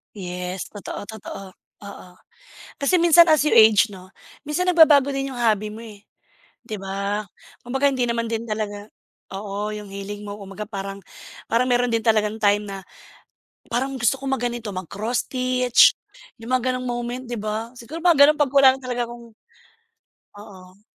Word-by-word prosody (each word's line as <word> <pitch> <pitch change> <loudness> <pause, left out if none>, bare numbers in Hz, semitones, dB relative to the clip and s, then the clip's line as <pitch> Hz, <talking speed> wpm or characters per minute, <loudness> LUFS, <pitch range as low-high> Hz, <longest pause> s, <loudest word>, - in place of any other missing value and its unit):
Yes, 180 -1 -5
totoo-totoo. 200 -2 -9 0.3
Oo. 200 -2 -11 0.7
Kasi 280 +6 +3
minsan 340 0 +6
as 310 -2 +4
you - - +1
age 220 -1 +6
‘no, 185 -1 -12 0.4
minsan 300 +5 0
nagbabago 305 -6 +5
din 275 0 -2
yung 260 - -8
hobby 215 -3 +1
mo, 220 +2 -9
eh, 210 -3 -13 0.6
‘di 215 - -5
ba? 200 +1 -3 0.4
Kumbaga 265 +3 0
hindi 265 -2 -1
naman 235 -1 -1
din 225 0 -2
talaga, 210 -2 -5 0.4
oo, 200 +1 -4
yung 210 -1 -7
hilig 200 +1 -7
mo 205 - -6
kumbaga 200 +1 -8
parang 195 -1 -6 0.5
parang 250 +3 +1
meron 245 0 +2
din 225 - 0
talagang 220 -1 +1
time 205 0 +2
na 195 -1 -7 0.9
parang 260 +3 -1
gusto 240 +3 +2
kong 270 0 -4
mag - - -6
ganito, 235 -3 -6
mag-cross 200 +6 -3
stitch, 255 -1 +4 0.5
yung 225 - -10
mga 255 0 -1
gano’ng 255 0 -4
moment, 240 +1 -4
‘di 240 - -4
ba? 215 +2 -4
Siguro 265 +8 -8
mga 345 -1 +4
gano’n 300 +1 +2
‘pag 285 -3 +3
wala 275 -1 +6
na 270 - -10
talaga 245 -1 -2
akong 235 -1 -12 1.0
Oo. 190 -2 -14
225 Hz, 165 wpm, -22 LUFS, 205-255 Hz, 1.0 s, minsan